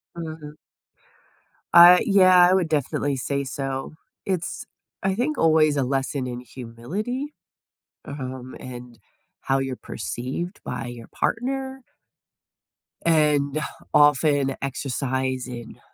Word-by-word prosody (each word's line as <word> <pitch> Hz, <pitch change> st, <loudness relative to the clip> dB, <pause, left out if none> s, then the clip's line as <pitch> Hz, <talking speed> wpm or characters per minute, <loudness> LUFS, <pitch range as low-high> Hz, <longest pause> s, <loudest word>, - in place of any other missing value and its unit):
Mhm. 155 Hz, -3 st, -7 dB, 1.2 s
Uh, 175 Hz, +1 st, +10 dB
yeah, 185 Hz, -3 st, +6 dB
I -, -, +4 dB
would 180 Hz, -4 st, +1 dB
definitely 145 Hz, -1 st, 0 dB
say 140 Hz, +2 st, -2 dB
so. 135 Hz, 0 st, -4 dB, 0.3 s
It's, 180 Hz, -4 st, -3 dB, 0.4 s
I 190 Hz, 0 st, 0 dB
think, 270 Hz, +8 st, -1 dB
always 155 Hz, -2 st, +4 dB
a 140 Hz, -, +1 dB
lesson 135 Hz, 0 st, -1 dB
in 120 Hz, -1 st, -5 dB
humility, 150 Hz, -, -5 dB, 0.7 s
uh-huh 140 Hz, -1 st, -7 dB
um, 130 Hz, 0 st, -7 dB
and 125 Hz, -2 st, -9 dB, 0.4 s
how 135 Hz, 0 st, +1 dB
you're 135 Hz, -1 st, -2 dB
perceived 135 Hz, -, -5 dB
by 125 Hz, -1 st, -4 dB
your 120 Hz, -2 st, -9 dB
partner 265 Hz, +2 st, -2 dB, 1.2 s
and 150 Hz, -3 st, +2 dB, 0.3 s
often 145 Hz, -2 st, +4 dB
exercise 130 Hz, -1 st, -2 dB
in, 120 Hz, -2 st, -9 dB
145 Hz, 110 wpm, -24 LUFS, 130-175 Hz, 1.2 s, Uh